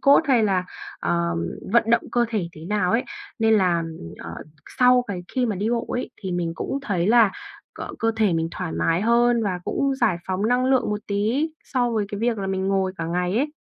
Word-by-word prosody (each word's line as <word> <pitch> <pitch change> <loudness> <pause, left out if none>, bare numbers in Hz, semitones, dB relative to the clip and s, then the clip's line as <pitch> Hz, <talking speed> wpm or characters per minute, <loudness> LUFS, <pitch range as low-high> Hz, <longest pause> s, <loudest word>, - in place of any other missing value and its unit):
cốt 280 +2 +6
hay 255 -6 +3
là, 185 -3 +1 0.4
ờ, 85 0 0 0.4
vận 230 -1 +4
động 235 - +4
cơ 240 -1 +3
thể 205 -7 -2
thế 155 +1 -11
nào 195 -2 0
ấy, 235 +4 +2 0.3
nên 225 0 +4
là, 180 -4 +3 0.4
ờ, 85 - -8 0.5
sau 250 0 +5
cái 180 -3 -4
khi 255 -2 0
mà 210 -4 -1
đi 210 +4 -1
bộ 235 -1 -1
ấy, 245 - -3
thì 185 -2 -3
mình 170 -2 -1
cũng 275 - -3
thấy 185 -8 0
là 225 -2 +5 0.5
c - - -8 0.2
cơ 225 0 +1
thể 210 -5 +3
mình 165 0 0
thoải 180 -2 -5
mái 165 +1 +1
hơn, 235 +1 +3
và 185 -4 -1
cũng 275 -1 0
giải 235 -9 +2
phóng 190 +3 -1
năng 250 +1 +2
lượng 260 -4 +2
một 210 - -2
tí 220 +10 0 0.2
so 245 -2 0
với 215 -3 0
cái 205 0 -5
việc 230 -2 +1
là 195 - -3
mình 190 0 -1
ngồi 190 -1 +1
cả 165 - -3
ngày 180 +3 -1
ấy. 285 +5 +1
210 Hz, 225 wpm, -23 LUFS, 185-240 Hz, 0.5 s, cốt